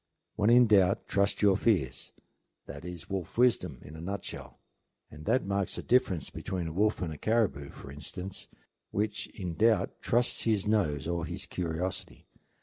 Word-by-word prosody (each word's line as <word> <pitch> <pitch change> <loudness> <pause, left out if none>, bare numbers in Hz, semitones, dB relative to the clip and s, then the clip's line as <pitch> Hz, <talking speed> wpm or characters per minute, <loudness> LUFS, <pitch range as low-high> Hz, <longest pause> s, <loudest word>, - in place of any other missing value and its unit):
When 105 +1 +2
in 120 +1 +7
doubt 100 -4 +4
trust 100 +1 +1
your 100 -2 +6
fears, 90 - +1 0.5
that 70 +3 -9
is 90 -2 -7
wolf 95 -1 -4
wisdom 125 -1 +3
in 75 - -11
a 80 - -8
nutshell; 100 +3 -6 0.5
and 75 +1 -11
that 130 - +2
marks 100 0 -1
the - - -5
difference 115 - +2
between 90 -3 -4
a 80 - -4
wolf 105 +1 +1
and 80 -3 -3
a 75 - -10
caribou, 100 -12 +1
for 70 - -11
instance, 90 +7 -6 0.4
which 105 +1 -1
in 90 -5 -5
doubt 105 +2 +2
trusts 120 0 +2
his 110 -3 +2
nose 80 -10 +1
or 85 -1 -1
his - - -5
curiosity. 90 +1 -4
95 Hz, 165 wpm, -30 LUFS, 80-105 Hz, 0.5 s, in